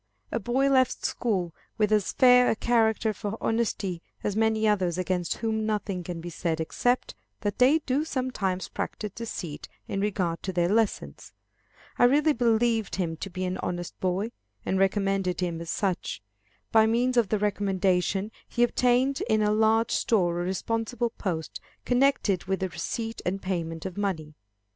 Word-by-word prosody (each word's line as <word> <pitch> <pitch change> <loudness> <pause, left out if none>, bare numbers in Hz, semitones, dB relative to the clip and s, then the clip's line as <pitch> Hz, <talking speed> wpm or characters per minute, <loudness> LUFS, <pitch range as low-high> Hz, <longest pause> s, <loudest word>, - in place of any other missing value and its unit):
A 230 - 0
boy 250 +5 +1
left 260 -2 +2
school 185 -8 -1 0.2
with 215 -1 +2
as 210 -3 +2
fair 250 -1 +6
a - - +2
character 220 -1 +2
for 210 +1 -5
honesty 205 -6 -1 0.2
as 205 - -1
many 220 0 +2
others 185 -5 +1
against 180 -1 -1
whom 220 -1 -1
nothing 210 -4 -2
can 170 -1 -5
be 175 - -6
said 165 -1 -2
except 245 +10 0 0.3
that 205 -1 -2
they 260 +5 +6
do 275 +3 +1
sometimes 250 -11 -2
practise 210 -2 -4
deceit 180 -9 -6 0.2
in 195 - -2
regard 185 -5 -1
to 190 - -3
their 175 -1 +1
lessons. 205 - -1 0.7
I 245 - +7
really 295 +4 +4
believed 230 -2 +1
him 170 -4 -1
to 195 - -5
be 185 0 -4
an 185 0 -3
honest 175 -1 -4
boy, 190 +5 -1 0.3
and 190 - 0
recommended 195 -2 +1
him 170 -2 -2
as 170 - -7
such. 185 - -2 0.5
By 220 0 +5
means 245 +3 +1
of 235 -5 +3
the 215 - +2
recommendation, 195 -1 0 0.2
he 240 - +1
obtained 250 +3 +2
in 215 -1 +3
a 210 - +2
large 220 +2 +3
store 175 -6 +1
a - - -2
responsible 225 +5 -1
post 165 -7 -4 0.2
connected 245 -7 +2
with 190 0 -1
the 190 - -1
receipt 225 +5 -4
and 190 +2 -1
payment 165 -3 -3
of 190 -1 -5
money. 170 -7 -2
205 Hz, 165 wpm, -27 LUFS, 180-230 Hz, 0.7 s, I